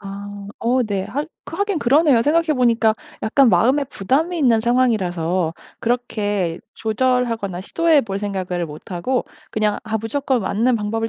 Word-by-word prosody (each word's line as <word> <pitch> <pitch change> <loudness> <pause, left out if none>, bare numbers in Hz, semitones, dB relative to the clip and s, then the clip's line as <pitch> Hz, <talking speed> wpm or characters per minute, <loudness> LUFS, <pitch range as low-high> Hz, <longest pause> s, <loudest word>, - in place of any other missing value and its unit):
아. 200 0 -8
어 250 +2 +2
네. 200 -4 -2
학 280 +10 -4 0.2
하긴 405 -4 -1
그러네요. 275 -1 +4
생각해 330 +5 +2
보니까 230 -3 +3 0.3
약간 265 +4 +4
마음에 265 +6 +3
부담이 280 - -1
있는 240 -7 +4
상황이라서 185 -9 +1 0.3
그렇게 205 -7 -1 0.2
조절하거나 225 -4 0
시도해 320 - +3
볼 195 -3 -4
생각을 185 -4 -3
못 150 +4 -11
하고 220 +9 -1 0.3
그냥 210 -1 0
'아 220 -1 -1
무조건 255 +2 -1
맞는 230 +6 +1
방법을 225 +1 -2
225 Hz, 325 characters per minute, -20 LUFS, 200-255 Hz, 0.3 s, 그러네요